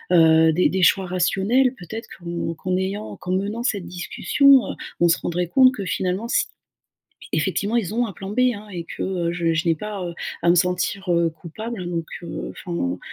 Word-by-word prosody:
heu, 160 -1 +6
des 175 +3 +3
des 190 0 -1
choix 190 +2 +4
rationnels 195 +8 +2
peut-être, 220 +3 -8
qu'on 170 -2 -4
qu'en 185 +3 -2
ayant 195 +3 -3
qu'en 185 0 -4
menant 205 +5 -1
cette 200 -7 -1
discussion, 265 +9 +3
heu, - - -7 0.2
on 175 - +5
se 165 - +3
rendrait 175 0 -2
compte 255 +7 +5
que 200 -4 -5
finalement 185 +4 -1
s 235 - +1 0.9
effectivement, 210 +4 0
ils 215 -2 -1
ont 240 0 +1
un 200 - -7
plan 195 +3 -8
B, 235 - 0
hein, 210 +1 -10
et 170 -3 -5
que, - - -7
heu, 175 -3 -1
je 170 -2 0
je 160 +3 -1
n'ai 165 - +4
pas, 205 +2 -5
heu, 170 - -4 0.3
à 170 - +4
me 175 - +6
sentir, 180 +1 0
heu, 170 -1 +3
coupable. 180 +5 -7
Donc, 170 -2 -2 0.2
heu, 170 - -5
enfin, 95 - -3
180 Hz, 200 wpm, -22 LUFS, 170-210 Hz, 0.9 s, heu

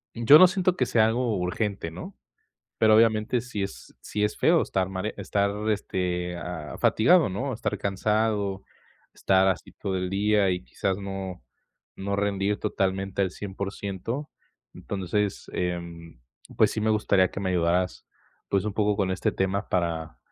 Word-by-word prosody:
yo 120 +6 +8
no 185 - +9
siento 185 0 +1
que 125 - +1
sea 110 -2 +3
algo 115 -2 0
urgente, 90 0 -2
¿no? 180 - -9 0.6
Pero, 110 -1 +5
obviamente, 115 +2 +3
sí 110 -5 -4
es 95 - -7
sí 105 0 -2
es 105 - -1
feo - - +4
estar 95 - -1
estar - - -8
mare 95 +3 -3
estar 100 0 0 0.2
este, 90 -3 -2
ah, 85 -4 -6
fatigado, 165 - +4
¿no?, 125 +8 -3
estar 110 -2 -2
cansado, 100 0 0 0.5
estar 95 0 +2
así 95 - -2
todo 95 -1 -3
el 90 0 -2
día 100 0 +2
y 90 -5 -2
quizás 95 +10 -2
no 95 -5 -6 0.5
no 100 +1 -2
rendir 100 0 0
totalmente 95 0 -1
al 95 - 0
100%. 100 +7 -5 0.4
Entonces, 100 +1 -3
em, 85 -4 -4 0.4
pues - - +4
sí 110 - -3
me 110 - +1
gustaría 100 -3 +3
que - - -6
me 95 - -1
ayudaras, 90 +1 0 0.4
pues, 100 -1 +1
un 105 - -2
poco 105 0 +1
con 95 -2 0
este 95 - 0
tema 95 +2 -1
para, 80 -8 -2
100 Hz, 160 wpm, -26 LUFS, 95-110 Hz, 0.6 s, no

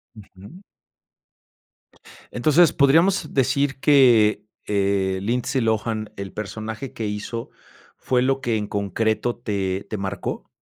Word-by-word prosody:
Ujú. 105 - -14 1.7
Entonces, 155 +7 +4
podríamos 160 +4 +3
decir 140 +1 +1
que, 120 -8 +4 0.2
eh, 100 -2 0
Lindsay 120 +4 -1
Lohan, 110 -1 -1
el 100 -1 -6
personaje 110 +4 -6
que 110 - -4
hizo, 105 +3 -5 0.5
¿fue 125 -1 0
lo 135 +1 +1
que 115 -3 0
en 105 -1 -3
concreto 110 +3 -1
te 100 -4 -3
te 110 - -3
marcó? 95 -1 -5
110 Hz, 115 wpm, -22 LUFS, 100-135 Hz, 1.7 s, Entonces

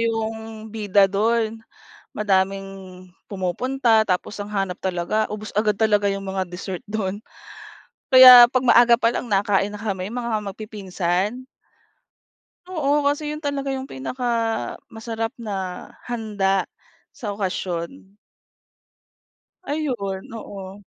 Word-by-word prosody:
yung 225 -1 -3
bida 205 -2 +3
dun. 220 +3 0 0.6
Madaming 195 -1 +1 0.6
pumupunta, 220 +4 +1
tapos 185 +3 -1
ang 205 - -5
hanap 195 -3 -2
talaga 190 +4 -1
ubos 215 0 -6
agad 210 0 +1
talaga 210 -1 +2
yung 195 0 -3
mga 190 -1 -2
dessert 180 +1 -6
dun. 205 -2 -3 0.9
Kaya 255 -2 +10
pag 255 0 0
maaga 240 0 +6
pa 230 0 +1
lang 245 - -4
nakain 200 0 +2
na 210 - -7
kami 195 -3 -3
mga 235 -2 -2
mag-pipinsan. 200 +1 -3 1.2
Oo 295 -5 0
kasi 290 +1 0
yun 300 +1 -6
talaga 280 -1 -2
yung 265 - -5
pinaka-masarap 225 - -3
na 225 -3 -6 0.5
handa 205 -5 -1 0.5
sa 210 -8 -6
okasyon. 190 +2 -4 1.5
Ayun, 245 - -3
oo. 195 -2 -9
215 Hz, 110 wpm, -22 LUFS, 195-235 Hz, 1.5 s, Kaya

